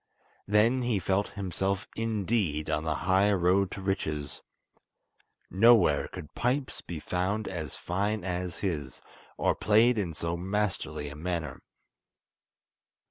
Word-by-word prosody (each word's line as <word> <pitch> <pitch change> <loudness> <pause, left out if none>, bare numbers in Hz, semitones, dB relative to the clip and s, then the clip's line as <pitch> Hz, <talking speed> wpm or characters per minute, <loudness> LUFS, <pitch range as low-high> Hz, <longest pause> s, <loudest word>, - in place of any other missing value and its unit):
Then 110 +5 +3
he 120 -3 +1
felt 95 +2 0
himself 95 +2 -2
indeed 105 -8 -1
on 75 - 0
the 80 -1 0
high 95 +2 +4
road 95 +1 +3
to 95 - -7
riches. 75 -7 -2 1.1
Nowhere 105 -8 +5
could 75 - -10
pipes 130 +3 -1
be 85 -3 -6
found 95 +6 -1
as 80 -6 -4
fine 100 +3 -2
as 90 -2 -3
his, 75 -9 -3 0.3
or - - +2
played 110 +2 +4
in 85 -6 -3
so 85 +2 -2
masterly 95 -4 -2
a 70 - -7
manner. 80 -3 -4
95 Hz, 125 wpm, -29 LUFS, 85-105 Hz, 1.1 s, Nowhere